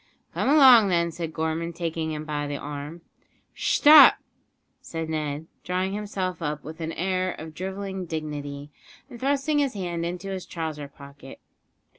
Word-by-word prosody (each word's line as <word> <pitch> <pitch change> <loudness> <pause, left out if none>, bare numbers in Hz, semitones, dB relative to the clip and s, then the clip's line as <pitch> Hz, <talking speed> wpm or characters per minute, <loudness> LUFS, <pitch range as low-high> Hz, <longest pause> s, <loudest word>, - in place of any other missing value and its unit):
"Come - - 0
along, 260 -7 +8
then," 170 -2 +1
said 165 -1 -5
Gorman, 160 +1 -2
taking 165 -1 -3
him 155 0 -5
by 145 -1 -3
the 145 0 -3
arm. 145 +4 -7 0.5
"Shtop!" 300 0 +7 0.7
said 165 -1 -5
Ned, 150 -1 -3 0.2
drawing 185 +1 -1
himself 190 -4 -4
up 150 -2 -3
with 160 +2 -9
an 160 0 -3
air 185 +1 -1
of 160 0 -9
drivelling 190 +1 -5
dignity, 145 -2 -5 0.4
and 240 - -10
thrusting 285 +3 +1
his 275 -5 0
hand 175 -3 -3
into 180 +3 -4
his 190 -2 -5
trouser 155 -4 -5
pocket. 140 -1 -13
170 Hz, 150 wpm, -25 LUFS, 155-190 Hz, 0.7 s, along